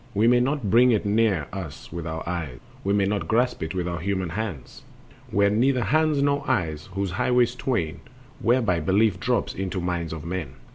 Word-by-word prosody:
We 110 +3 +4
may 120 +1 +5
not 125 -5 0
bring 125 +2 +6
It 110 -2 +1
near 100 -6 +2
us 90 -7 -7
with 85 -1 -5
our 80 0 -5
eyes, 80 -8 -3 0.3
We 100 - 0
may 100 -1 +3
not 100 -4 -1
grasp 125 +5 +1
It 80 +2 -4
with 90 -1 -1
our 85 0 -3
human 95 0 -2
hands, 95 - -5 0.5
With 100 +1 +3
neither 125 +3 +2
hands 150 +5 +2
nor 140 0 +1
eyes, 80 - -1
those 100 -2 -1
highways 125 +5 +2
twain 105 -11 -2 0.4
Whereby 115 -8 +2
Belief 95 +4 +2
drops 125 -1 0
into 95 -1 -3
minds 85 -2 -2
of 80 -2 -6
men. 85 -6 -4
100 Hz, 190 wpm, -25 LUFS, 85-120 Hz, 0.5 s, bring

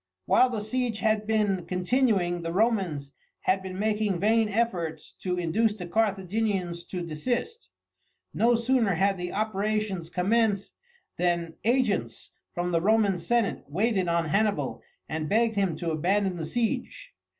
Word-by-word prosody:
While 255 - +5
the 220 -4 -3
siege 240 0 -1
had 215 -1 +1
been 210 -4 +1
continuing 185 -2 +1
the 165 0 -3
Romans 180 -9 0 0.3
had 190 0 +1
been 185 -1 -6
making 210 -2 0
vain 220 +2 +3
efforts 195 -7 -2
to 180 -1 -2
induce 205 +6 +1
the 180 -4 -7
Carthaginians 195 -2 -1
to 180 -1 -5
desist. 240 - -3 0.6
No 235 +1 +3
sooner 230 -4 +2
had 195 +2 +1
the 180 0 -4
operations 210 -3 -1
commenced 200 +3 +1 0.5
than 170 -2 0
agents 240 -4 0 0.2
from 175 0 -2
the 165 -1 +2
Roman 205 -2 +3
senate 235 0 0
waited 190 - 0
on 170 -1 +1
Hannibal 205 +6 0 0.3
and 155 -1 -3
begged 225 +1 +2
him 195 -5 +1
to 165 +1 -3
abandon 185 +4 +1
the 160 -2 -4
siege. 240 - -2
200 Hz, 140 wpm, -27 LUFS, 175-220 Hz, 0.6 s, While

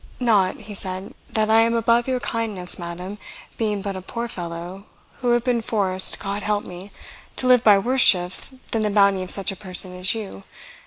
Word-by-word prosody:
"Not," 215 -6 +1
he 210 0 -10
said, 190 -1 -6 0.2
"that 215 0 0
I 225 - +5
am 230 +1 +2
above 235 +1 +1
your 255 -1 -1
kindness, 215 -8 -3
madam, 180 +4 -8 0.4
being 210 -3 -2
but 200 -1 -5
a 185 - -7
poor 235 +5 -6
fellow, 175 0 -8 0.3
who 245 - -2
have 240 -1 +1
been 245 -2 -1
forced, 190 -4 +1
God 200 0 -5
help 205 0 -2
me! 180 +3 -11 0.4
to - - -3
live 250 -1 +4
by 205 -2 +6
worse 250 +6 0
shifts 180 -3 +7 0.2
than 225 - -1
the 210 - 0
bounty 200 -2 +2
of 185 - -7
such 195 +2 +3
a - - -8
person 185 -1 0
as 185 +4 +1
you. 200 - -8
205 Hz, 200 wpm, -21 LUFS, 185-225 Hz, 0.4 s, shifts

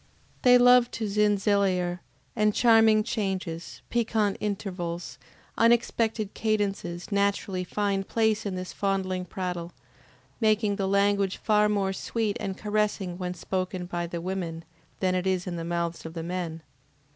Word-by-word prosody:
They 250 -1 +7
love 245 0 +6
to 225 - -2
ZINZILYLER, 200 -3 +2 0.4
and 210 -1 +2
charming 225 -2 +5
changes, 190 -7 -4
piquant 220 -4 +1
intervals, 180 -4 -4 0.4
unexpected 230 -2 +2
cadences 200 -5 -2
naturally 200 -2 0
find 195 +1 -1
place 220 -1 +1
in 200 -3 -3
this 185 0 -5
fondling 190 -2 -1
prattle, 180 -1 -4 0.7
making 215 -2 +2
the 195 -2 0
language 200 0 +2
far 210 -1 +3
more 195 -2 0
sweet 215 +2 -2
and 195 -3 -4
caressing 210 -4 -1
when 180 -1 -3
spoken 185 -1 -3
by 175 -1 -3
the 170 0 -5
women, 170 -3 -4 0.4
than 185 -1 +2
it 185 0 0
is 185 -1 0
in 180 -2 -4
the 165 - -4
mouths 170 0 -2
of 160 +1 -8
the 165 - -4
men. 170 -2 -4
195 Hz, 140 wpm, -27 LUFS, 180-210 Hz, 0.7 s, They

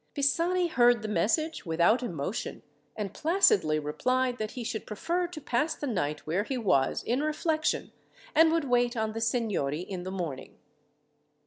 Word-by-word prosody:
Pisani 335 +6 +2
heard 240 -6 +4
the - - -3
message 225 - 0
without 170 +9 +3
emotion, 185 - -4 0.3
and 205 -3 -4
placidly 300 - +3
replied 250 +12 0
that 215 -1 -3
he 245 - -5
should 225 -1 -4
prefer 345 - -1
to 340 -3 -8
pass 295 +3 0
the - - -5
night 165 - -2
where 170 +6 0
he 260 +4 -3
was 180 - +1
in 250 +4 0
reflection, 310 0 -1 0.4
and 320 0 +6
would 330 -1 +1
wait 245 -1 +2
on 220 -1 0
the 225 +1 -5
seignory 210 - 0
in 185 0 -6
the 185 - -5
morning. 170 -9 -5
235 Hz, 160 wpm, -29 LUFS, 185-295 Hz, 0.4 s, and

